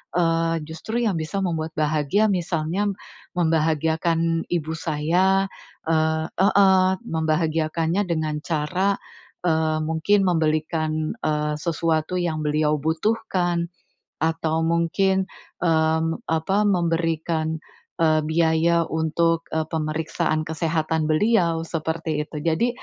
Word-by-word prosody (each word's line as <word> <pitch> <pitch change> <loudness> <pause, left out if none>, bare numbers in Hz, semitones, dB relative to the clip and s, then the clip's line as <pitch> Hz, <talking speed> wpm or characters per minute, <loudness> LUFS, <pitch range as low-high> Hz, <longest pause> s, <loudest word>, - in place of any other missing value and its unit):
eee, 165 -1 +1
justru 220 +9 -4
yang 210 -5 +1
bisa 160 +5 -3
membuat 160 -3 -2
bahagia, 155 +7 +2
misalnya 180 +1 -1 0.5
membahagiakan 165 0 +1
ibu 160 -2 -1
saya, 175 +5 +1 0.4
eee 160 0 +2
heeh, 190 -1 +5 0.2
membahagiakannya 160 +2 0
dengan 155 -3 -1
cara, 175 +5 0 0.5
eee, 160 -2 +2
mungkin 160 +6 +2
membelikan, 155 -1 0
eee, 150 -1 0
sesuatu 165 0 0
yang 160 -3 -1
beliau 150 0 +2
butuhkan, 175 +1 0 0.6
atau 160 0 0
mungkin, 190 +3 +2 0.4
mmm, 160 -1 +1
apa, 190 +6 +1
memberikan 165 -3 0 0.6
biaya 165 +1 +2
untuk 165 +1 +1 0.2
pemeriksaan 155 0 -1
kesehatan 160 0 -1
beliau, 170 +1 +2
seperti 160 -1 -2
itu. 155 - -10
Jadi, 165 +9 +1
160 Hz, 95 wpm, -23 LUFS, 155-175 Hz, 0.6 s, heeh